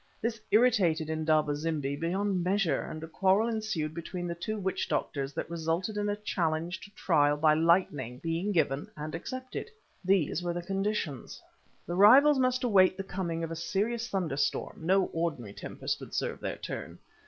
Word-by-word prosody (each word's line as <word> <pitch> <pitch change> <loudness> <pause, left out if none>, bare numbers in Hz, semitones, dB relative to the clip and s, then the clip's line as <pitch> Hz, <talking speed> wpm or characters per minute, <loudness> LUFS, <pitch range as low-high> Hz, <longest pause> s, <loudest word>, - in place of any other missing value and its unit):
This 225 -1 -2
irritated 190 -10 +3
Indaba 155 -2 +2
zimbi 145 -2 -2
beyond 180 +4 -1
measure, 190 -2 +1
and 155 0 -7
a - - -5
quarrel 190 +6 +2
ensued 215 -9 -2
between 175 +2 -5
the 170 - -2
two 215 +6 -4
witch 190 -2 -2
doctors 135 -1 -1
that - - -3
resulted 170 +5 -2
in 205 0 -1
a 205 - 0
challenge 170 -4 -2
to - - -12
trial 145 -4 +3
by 155 0 +4
lightning 155 -7 +2
being 165 +7 -2
given 145 -6 0
and 150 +1 -5
accepted. 255 - -5 0.3
These 185 -3 +2
were 175 -1 -2
the 175 0 -4
conditions. 195 - -3 0.5
The 175 - -4
rivals 265 +10 +7
must 255 0 +1
await 190 -6 +4
the 195 - -3
coming 175 -3 -3
of 165 - -4
a - - -3
serious 220 +8 -1
thunderstorm, 160 -3 -2
no 190 0 +4
ordinary 150 -11 -2
tempest - - -4
would - - -9
serve - - -2
their - - -4
turn. - - -6
175 Hz, 170 wpm, -30 LUFS, 155-205 Hz, 0.5 s, rivals